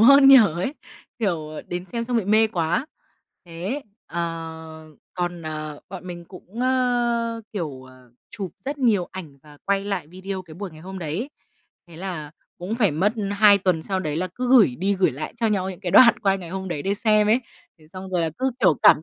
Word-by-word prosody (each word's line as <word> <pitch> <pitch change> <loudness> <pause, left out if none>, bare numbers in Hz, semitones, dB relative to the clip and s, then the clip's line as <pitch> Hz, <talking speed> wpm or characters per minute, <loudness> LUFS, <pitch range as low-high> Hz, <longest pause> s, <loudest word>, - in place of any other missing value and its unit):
hơn 275 +4 +8
nhỉ?" 275 - +11
ấy, 205 - +3 0.4
kiểu, 170 -9 -1 0.2
đến 175 0 -4
xem 235 -1 -2
xong 245 0 -1
bị 225 - +1
mê 215 +2 +4
quá. 175 - -1 0.6
Thế, 180 - -4 0.2
ờ, 160 -1 -6 0.3
còn, 175 -1 -3
ờ, 155 -1 -5
bọn 185 -1 -8
mình 175 -1 -7
cũng, 190 +5 -10
ơ, 240 -2 +1
kiểu, 155 -10 -4
ờ, 130 -1 -17 0.2
chụp 195 -3 -5
rất 285 +2 -5
nhiều 215 -9 +2
ảnh 160 -7 -9
và 150 -1 -16
quay 200 0 0
lại 195 -6 -3
video 185 +3 -6
cái 165 -3 -13
buổi 195 +2 -6
ngày 155 -1 -14
hôm 190 +3 -8
đấy, 180 - -4 0.6
thế 165 - -13
là 170 -5 -5 0.3
cũng 185 +6 -3
phải 215 -6 +3
mất 185 +9 +1 0.2
2 205 0 +6
tuần 185 -4 +1
sau 190 +2 -1
đấy 155 -4 -3
là 185 +3 -1
cứ 250 0 -2
gửi 225 - +6
đi 195 +3 +1
gửi 190 -1 +2
lại 145 +4 -6
cho 230 - 0
nhau 195 -3 0
những 180 - -10
cái 180 - -3
đoạn 235 -2 +8
quay 195 -2 +2
ngày 175 -3 -9
hôm 190 +1 -4
đấy 155 -5 -3
để 195 +1 0
xem 215 0 +3
ấy. 225 +4 +4 0.4
Thế 155 - -20
xong 190 0 -8
rồi 180 -2 +1
là 165 - 0
cứ, 265 +1 +1
kiểu, 155 - +5
cảm 150 - +7
190 Hz, 210 wpm, -23 LUFS, 165-220 Hz, 0.6 s, nhỉ